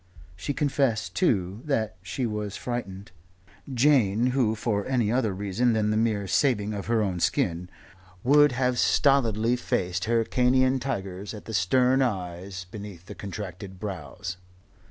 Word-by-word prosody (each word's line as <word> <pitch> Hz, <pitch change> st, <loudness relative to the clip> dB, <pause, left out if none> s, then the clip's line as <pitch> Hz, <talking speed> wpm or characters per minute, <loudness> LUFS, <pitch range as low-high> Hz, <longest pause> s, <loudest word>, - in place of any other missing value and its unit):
She 95 Hz, +10 st, -4 dB
confessed, 125 Hz, -11 st, 0 dB
too, 95 Hz, +1 st, 0 dB
that 110 Hz, -8 st, -1 dB
she 95 Hz, +8 st, -3 dB
was 105 Hz, -2 st, -3 dB
frightened 100 Hz, -6 st, -5 dB, 0.6 s
Jane 120 Hz, -5 st, +3 dB
who, 120 Hz, -4 st, +1 dB
for 105 Hz, -2 st, -1 dB
any 120 Hz, -5 st, +1 dB
other 120 Hz, -4 st, +1 dB
reason 100 Hz, +5 st, 0 dB
than 105 Hz, -1 st, +1 dB
the -, -, +1 dB
mere 110 Hz, -2 st, +1 dB
saving 105 Hz, 0 st, +1 dB
of 100 Hz, -1 st, -5 dB
her 115 Hz, -1 st, +2 dB
own 95 Hz, -3 st, -2 dB
skin, 85 Hz, +1 st, 0 dB, 0.5 s
would 145 Hz, +2 st, +6 dB
have 125 Hz, 0 st, 0 dB
stolidly 120 Hz, -4 st, +3 dB
faced 90 Hz, -6 st, -1 dB
Hyrcanean 125 Hz, +3 st, +2 dB
tigers 100 Hz, -5 st, -4 dB
at 105 Hz, -, -10 dB
the 110 Hz, -, -7 dB
stern 125 Hz, +8 st, +3 dB
eyes 95 Hz, -4 st, -3 dB
beneath 100 Hz, -5 st, -9 dB
the -, -, -8 dB
contracted 95 Hz, -1 st, -7 dB
brows. 90 Hz, -3 st, -6 dB
110 Hz, 140 wpm, -26 LUFS, 95-125 Hz, 0.6 s, would